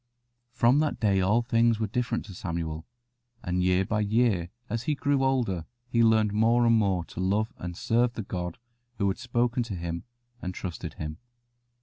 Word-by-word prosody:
From 125 Hz, +2 st, +4 dB
that 155 Hz, -1 st, 0 dB
day 100 Hz, -3 st, +3 dB
all 105 Hz, +6 st, +3 dB
things 115 Hz, -2 st, +3 dB
were 110 Hz, -, +1 dB
different 115 Hz, +2 st, -2 dB
to 100 Hz, -, -10 dB
Samuel, 85 Hz, -3 st, -4 dB, 0.6 s
and 90 Hz, +1 st, 0 dB
year 90 Hz, +1 st, +3 dB
by 110 Hz, +2 st, 0 dB
year 105 Hz, -4 st, +2 dB, 0.2 s
as 115 Hz, +1 st, -3 dB
he 150 Hz, -, +2 dB
grew 140 Hz, -1 st, +1 dB
older 120 Hz, -11 st, +1 dB, 0.2 s
he 115 Hz, -, +2 dB
learned 110 Hz, -2 st, +4 dB
more 115 Hz, +3 st, +4 dB
and 115 Hz, 0 st, +5 dB
more 95 Hz, -6 st, +1 dB
to -, -, -10 dB
love 100 Hz, +4 st, 0 dB
and 90 Hz, 0 st, -6 dB
serve 120 Hz, +1 st, +2 dB
the 110 Hz, -, -4 dB
God 90 Hz, -3 st, -4 dB, 0.4 s
who 100 Hz, -, +1 dB
had 95 Hz, -, -3 dB
spoken 120 Hz, 0 st, 0 dB
to 115 Hz, -4 st, -4 dB
him 85 Hz, -1 st, -4 dB, 0.4 s
and 90 Hz, 0 st, -4 dB
trusted 90 Hz, -3 st, -6 dB
him. 75 Hz, +1 st, -6 dB
110 Hz, 185 wpm, -27 LUFS, 90-120 Hz, 0.6 s, and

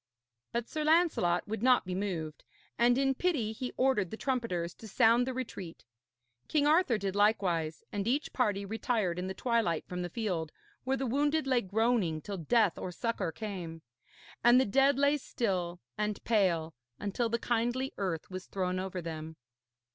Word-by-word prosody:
But 235 Hz, 0 st, -2 dB
Sir 310 Hz, -, -3 dB
Lancelot 305 Hz, -, +3 dB
would 220 Hz, 0 st, -3 dB
not 250 Hz, -2 st, +4 dB
be 180 Hz, -, -4 dB
moved, 175 Hz, -6 st, -3 dB, 0.3 s
and 240 Hz, +1 st, +4 dB
in 270 Hz, 0 st, +2 dB
pity 270 Hz, -8 st, 0 dB
he 250 Hz, +3 st, -5 dB
ordered 255 Hz, -8 st, +2 dB
the 220 Hz, -, -6 dB
trumpeters 225 Hz, -11 st, -2 dB
to 220 Hz, -, -10 dB
sound 230 Hz, +4 st, +4 dB
the 260 Hz, -, -2 dB
retreat. 195 Hz, -9 st, -6 dB, 0.6 s
King 295 Hz, -2 st, +2 dB
Arthur 300 Hz, -6 st, +4 dB
did 195 Hz, -2 st, -3 dB
likewise, 180 Hz, -7 st, +1 dB
and 205 Hz, 0 st, -2 dB
each 275 Hz, +5 st, 0 dB
party 205 Hz, -6 st, +1 dB
retired 210 Hz, -4 st, -1 dB
in 185 Hz, -, -3 dB
the 190 Hz, -, -4 dB
twilight 230 Hz, -10 st, 0 dB
from 180 Hz, 0 st, -4 dB
the 175 Hz, -, -3 dB
field, 175 Hz, -7 st, -2 dB, 0.3 s
where 265 Hz, +1 st, +1 dB
the 270 Hz, -, -2 dB
wounded 290 Hz, +5 st, +1 dB
lay 255 Hz, -3 st, +2 dB
groaning 205 Hz, -5 st, +1 dB
till 200 Hz, +5 st, -6 dB
death 200 Hz, +3 st, +2 dB
or 185 Hz, -, -4 dB
succour 195 Hz, -2 st, -2 dB
came; 175 Hz, -5 st, -6 dB, 0.6 s
and 240 Hz, +1 st, +7 dB
the 260 Hz, -, +3 dB
dead 270 Hz, +5 st, +3 dB
lay 285 Hz, +1 st, +3 dB
still 185 Hz, -10 st, -2 dB, 0.2 s
and 210 Hz, -1 st, -2 dB
pale, 175 Hz, -8 st, +1 dB, 0.3 s
until 210 Hz, +3 st, -1 dB
the 235 Hz, -, +1 dB
kindly 240 Hz, +3 st, -1 dB
earth 185 Hz, -3 st, -3 dB
was 185 Hz, 0 st, -6 dB
thrown 185 Hz, -1 st, -1 dB
over 185 Hz, -1 st, -4 dB
them. 160 Hz, -1 st, -6 dB
215 Hz, 170 wpm, -31 LUFS, 180-250 Hz, 0.6 s, and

